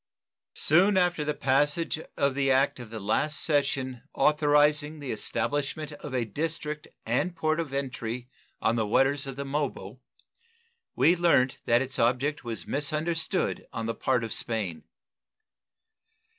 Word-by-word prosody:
Soon 190 +6 +4
after 180 -4 +2
the 150 0 -2
passage 145 +5 +1 0.2
of 140 -1 +2
the 135 0 +1
act 135 +1 +2
of 120 -3 -9
the 110 0 -6
last 145 +9 +1
session 135 -4 +1
authorizing 150 0 +3
the 140 -4 -5
establishment 145 +6 -2
of 145 -1 -8
a 125 -2 0
district 150 +5 -4 0.2
and 150 +10 0
port 155 0 0
of 160 -5 -3
entry 125 -3 -4 0.4
on 115 +1 +2
the 110 -2 0
waters 135 +5 +2
of 135 - -5
the 140 +1 -5
Mobile 145 +1 -3 0.9
we 175 - +5
learnt 150 -7 +3
that 120 +2 +3
its 135 0 -6
object 130 +6 +1
was 115 -2 -5
misunderstood 155 +3 -1
on 115 -1 -4
the 115 - -1
part 125 +2 0
of 115 - -4
Spain. 105 -8 -3
140 Hz, 145 wpm, -27 LUFS, 125-150 Hz, 0.9 s, we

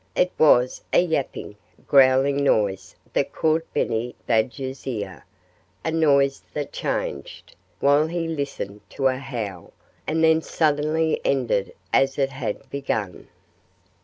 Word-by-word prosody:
It 180 0 +2
was 125 -5 +4
a - - +5
yapping, 145 -10 -2 0.3
growling 135 +1 +4
noise 100 -7 +1 0.2
that - - 0
caught 160 +1 0
Benny 115 +2 -1
Badger's 130 +4 -1
ear 100 -7 -5 0.6
a 160 - 0
noise 140 -4 +3
that 145 -2 -3
changed, - - -4 0.2
while 145 +2 +4
he 165 0 -2
listened, 140 -10 -4
to 135 - -4
a 130 - -1
howl, 110 -10 -6 0.3
and 160 +1 +1
then 160 0 +5
suddenly 155 +1 +1
ended 125 -7 0 0.2
as 135 0 +3
it 135 -1 +1
had 135 0 -5
begun. 110 -9 -3
135 Hz, 125 wpm, -23 LUFS, 120-155 Hz, 0.6 s, a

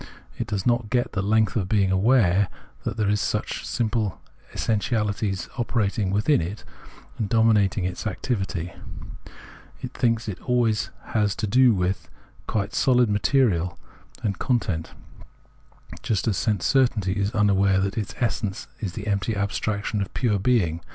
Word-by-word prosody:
It - - -2
does 100 -2 -2
not 120 -3 +1
get 120 +2 0
the 95 - -1
length 110 +2 +2
of 95 -5 -1
being 100 -3 +2
aware 100 -2 +4 0.4
that - - -3
there 105 -2 +1
are 105 - +3
such 105 - -2
simple 110 -4 -1 0.4
essentiahties 105 -3 -1
operating 105 -4 0
within 105 - +2
it 100 +7 -5 0.6
and 105 -3 -1
dominating 105 -4 +3
its 90 +4 -3
activity; 95 -5 -3 1.1
it - - -5
thinks 115 -2 0
it 105 - -4
has - - -19
always 120 -4 +1 0.5
to 110 - -2
do 120 +2 +5
with 90 0 -1 0.4
quite 100 -1 -1
sohd 125 -3 +3
material 100 -4 +2 0.5
and 100 -3 -1
content, 95 -10 -1 1.1
just 105 -3 -1
as 105 - +2
sense 100 -5 0
certainty 105 - +2
is 100 0 0
unaware 100 -2 +3
that 100 +1 -1
its 110 -2 -4
essence 105 -4 -2
is 95 -5 -4
the 105 - -6
empty 105 +1 0
abstraction 100 +1 -1
of 100 - -4
pure 110 -6 +1
being. 95 -7 +1
105 Hz, 145 wpm, -24 LUFS, 95-115 Hz, 1.1 s, do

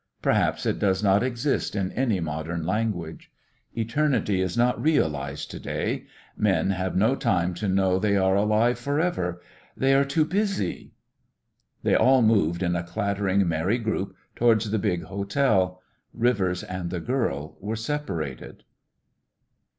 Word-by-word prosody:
Perhaps - - +1
it - - 0
does 95 0 +1
not 100 0 +4
exist 125 -1 -1
in 95 -2 -1
any 120 -7 0
modern 80 +1 -3
language. 95 -4 -2 0.5
Eternity 115 -4 +1
is 90 +1 -2
not 120 +1 +2
realised 75 - 0
to - - -7
day; - - -3 0.3
men 100 -2 +1
have 95 -1 -2
no 110 +8 +3
time 90 -7 0
to 95 +4 -3
know 95 -1 +2
they 100 0 +2
are 95 0 +3
alive 110 +4 +2
for 140 +4 -1
ever; 90 - -1 0.4
they 135 +1 +3
are 135 +1 +5
too 150 +3 +1
busy.... 195 - -2 0.9
They - - +2
all 130 -1 +5
moved 95 -6 +2
in 90 -1 +1
a 85 - 0
clattering, 100 +1 0
merry 85 +7 +1
group 110 -4 -3 0.2
towards 115 -3 +2
the 110 - +1
big 90 -5 -1
hotel. 100 0 0 0.4
Rivers 100 -7 +1
and 90 -1 -5
the 90 0 -3
girl 80 - -2
were 105 +3 -3
separated. 110 - -4
100 Hz, 145 wpm, -25 LUFS, 90-120 Hz, 0.9 s, are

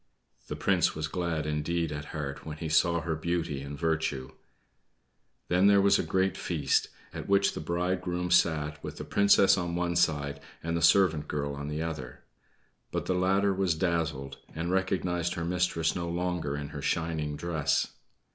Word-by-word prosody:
The - - -4
prince - - +2
was 80 0 -2
glad 85 -4 -2
indeed 75 +2 -1
at 75 0 -5
heart 75 -2 -5
when 75 -1 -7
he 80 0 -4
saw 85 +2 +3
her 85 -1 -2
beauty 80 -3 -2
and 70 +1 -7
virtue. 80 -5 -1 1.2
Then 90 +3 +4
there 100 -1 +6
was 100 0 +4
a - - +1
great 95 0 +1
feast, 75 -6 0 0.3
at - - -7
which 100 0 +3
the - - -5
bridegroom 90 +2 -1
sat, 75 -4 +2
with - - -6
the - - -5
Princess 100 -1 +4
on 85 -1 -2
one 85 0 -1
side 75 -4 +1 0.2
and 85 +1 -1
the 85 - -1
servant 80 -3 +4
girl 70 -1 -2
on 70 +1 -5
the 75 +2 -2
other. 75 -7 -6 0.7
But - - -2
the - - 0
latter 95 +2 +2
was 95 -3 +1
dazzled, 80 -5 -1 0.2
and 85 +2 -2
recognized 90 -2 0
her 85 - -3
mistress 90 -2 0
no 85 -1 -3
longer 85 -4 -2
in 75 0 -5
her - - -7
shining 80 -3 -1
dress. 80 -2 0
85 Hz, 175 wpm, -29 LUFS, 75-90 Hz, 1.2 s, there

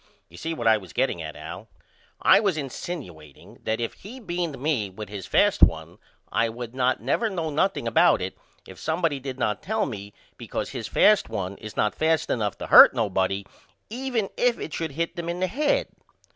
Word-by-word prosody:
You 85 - -14
see 165 - -4
what 120 - -5
I 110 -1 +6
was 95 -6 -13
getting - - 0
at - - -7
Al. - - -8 0.6
I - - +7
was 195 -7 0
insinuateing 125 - -8
that 110 +1 0
if 115 - -2
he 235 +7 -11
beaned 175 - -3
me 130 -7 -1
with 105 +3 -9
his 100 -3 -7
fast - - +3
one - - +3 0.3
I 115 0 +2
would 120 +1 -7
not 130 -3 0
never 220 - +1
know 165 -5 -3
nothing 155 -3 0
about 115 - +4
it - - -4 0.3
if 95 -1 -12
somebody 160 - -1
did 135 -1 -6
not 105 -5 -1
tell 220 +2 -1
me 105 -6 -7 0.3
because - - -4
his - - -5
fast 210 -1 +4
one 95 0 -4
is 110 -2 -10
not 105 - +2
fast 160 0 +1
enough 105 -4 -1
to - - -6
hurt - - +9
nobody 95 -2 0 0.5
even 245 -4 -2
if 245 -1 +2
it 160 - -6
should 160 -3 -3
hit 165 +4 -2
them 170 -1 -4
in 175 +1 -3
the 185 - +2
head. 305 - 0
140 Hz, 200 wpm, -25 LUFS, 105-175 Hz, 0.6 s, hurt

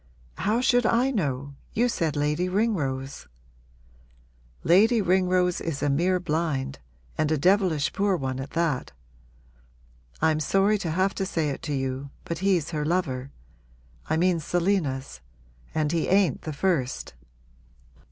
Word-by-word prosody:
'How 220 +4 +1
should 245 -2 +3
I 245 +4 +2
know? 140 - -2 0.2
You 240 +3 +2
said 165 - -1
Lady 150 +5 0
Ringrose.' 145 -11 -1 1.4
'Lady 215 +8 +5
Ringrose 180 -2 +2
is 155 -3 -3
a 145 - +2
mere 180 +6 +2
blind 155 - -2 0.4
and 155 0 +1
a 155 - +2
devilish 180 -2 +2
poor 200 -1 +1
one 130 -2 -3
at 135 - -5
that. 155 - 0 1.3
I'm 155 -1 +2
sorry 195 +7 +2
to 175 - -3
have 185 +4 +1
to 195 - -2
say 160 -6 -1
it 135 - -6
to - - 0
you, 135 +1 -3 0.2
but 170 - -4
he's 180 -5 +1
her 150 -2 -2
lover. 150 -6 -1 0.8
I - - +2
mean 175 0 +2
Selina's. 155 - -1 0.5
And 155 -1 +1
he 170 -2 0
ain't 190 -8 +2
the 155 - -5
first.' 145 - -1
165 Hz, 140 wpm, -26 LUFS, 145-190 Hz, 1.4 s, Lady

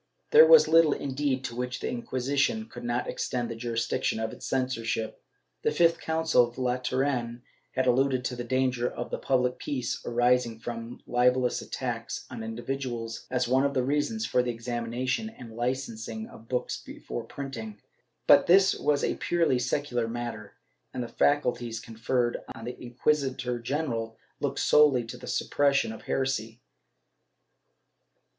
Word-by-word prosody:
^ - - -42
There 470 +1 +9
was 480 -1 +9
httle, 165 -3 +5
indeed, 135 -1 -1
to 115 - -5
which 125 +1 -3
the - - -3
Inquisition 135 - 0
could 120 - -10
not 120 +1 -1
extend 120 -2 -2
the - - -4
jurisdiction 115 +1 -1
of 110 0 -2
its - - -8
censorship. 115 -4 -2 0.4
The - - +2
fifth 165 -1 +3
Council 160 -5 +3
of 120 - -15
Lateran 125 -1 -1 0.3
had 130 0 +1
alluded 130 0 +2
to 125 - -2
the 120 - -4
danger 125 0 +1
to - - -5
the - - -2
public 125 -1 +1
peace 125 -4 -3
arising 120 -1 +2
from 115 0 -7
libellous 125 0 +2
attacks - - -4
on - - -6
individuals, 115 0 -4
as 125 -1 0
one 130 +2 +3
of 140 0 0
the 130 - +2
reasons 150 - 0
for 125 - +2
the 125 - -2
examination 120 - -2
and 120 - -12
licensing 115 -3 -3
of 115 +1 -15
books 125 -1 -2
before - - -7
printing, 115 -7 -7 0.5
but - - +7
this 190 +2 +6
was 145 -1 +1
a - - 0
purely 165 -7 +2
secular 125 -2 -1
matter, 115 -3 -5 0.4
and 125 - -2
the - - -5
faculties 120 -5 +1
conferred 120 +2 -1 0.2
on 115 - -8
the 125 +1 -5
inquis 130 +5 +1
itor 125 -2 -4
general 120 -4 -2 0.2
looked - - -2
solely 145 -5 +5
to 115 +2 -8
the - - -10
suppression 140 -5 +1
of 110 - -10
heresy. 120 -4 -2
125 Hz, 155 wpm, -28 LUFS, 120-135 Hz, 0.5 s, There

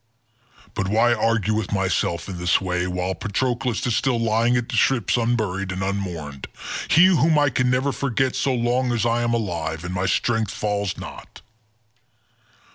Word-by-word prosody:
But 95 - -2
why 115 +4 +3
argue 115 -3 +1
with 110 -2 -2
myself 90 -3 0
in 95 -3 -6
this 90 0 +2
way, 90 -1 -1
while 90 +1 -2
Patroclus 120 +5 -2
is 120 -3 +1
still 120 0 +1
lying 115 +2 +2
at 120 -1 -2
the - - -3
ships 120 -7 +2
unburied, 110 -5 -1
and 95 0 -3
unmourned—he 95 - -1
whom 165 -4 +4
I 145 -2 +3
can 125 +1 +1
never 130 +3 +1
forget 135 -1 -1
so 135 - 0
long 125 +1 0
as 115 -1 0
I 120 0 +1
am 120 0 +1
alive 85 -7 -3
and 90 +1 -5
my 90 +1 -1
strength 110 +1 +1
fails 100 -3 -2
not? - - -10
110 Hz, 165 wpm, -23 LUFS, 95-120 Hz, -, whom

